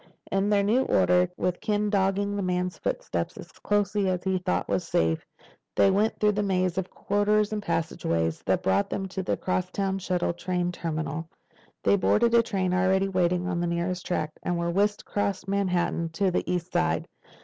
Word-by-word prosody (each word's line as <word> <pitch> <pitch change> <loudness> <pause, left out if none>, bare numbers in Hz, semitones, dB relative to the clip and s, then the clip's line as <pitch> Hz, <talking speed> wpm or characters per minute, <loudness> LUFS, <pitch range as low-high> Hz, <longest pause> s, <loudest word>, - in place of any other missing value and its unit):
In 195 +1 +1
their 205 -1 +3
new 225 +6 +3
order, 180 0 +3
with 180 -1 -1
Ken 210 -1 0
dogging 200 0 +1
the 200 - -1
man's 180 -1 -1
footsteps - - -3
as - - -10
closely 205 -1 0
as 180 -1 -1
he 190 0 0
thought 180 0 -1
was 180 - 0
safe, 80 - 0 0.5
they 195 - +5
went 210 +3 +1
through 210 0 +4
the 210 0 -1
maze 185 -3 +1
of 190 - -4
corridors 210 +1 +1
and 210 - -2
passageways 85 - -1
that - - +1
brought 95 +1 +2
them 195 - -3
to 190 - -3
the 185 - -1
crosstown 190 +1 -1
shuttle 180 -2 -1
train 180 0 -1
terminal. 160 -2 -4 0.5
They 200 - +4
boarded 235 +4 +3
a 235 - +7
train 190 -5 -1
already 190 +1 +2
waiting 180 -1 +1
on 180 -2 -1
the 175 - 0
nearest 170 +1 -2
track 155 -3 -2
and 175 -1 -1
were 170 0 -1
whisked 205 +3 +1
across 200 -2 -2
Manhattan 180 -4 0
to 190 +2 +1
the 180 - -1
east 180 0 -2
side. 80 +1 +1
185 Hz, 185 wpm, -27 LUFS, 175-200 Hz, 0.5 s, a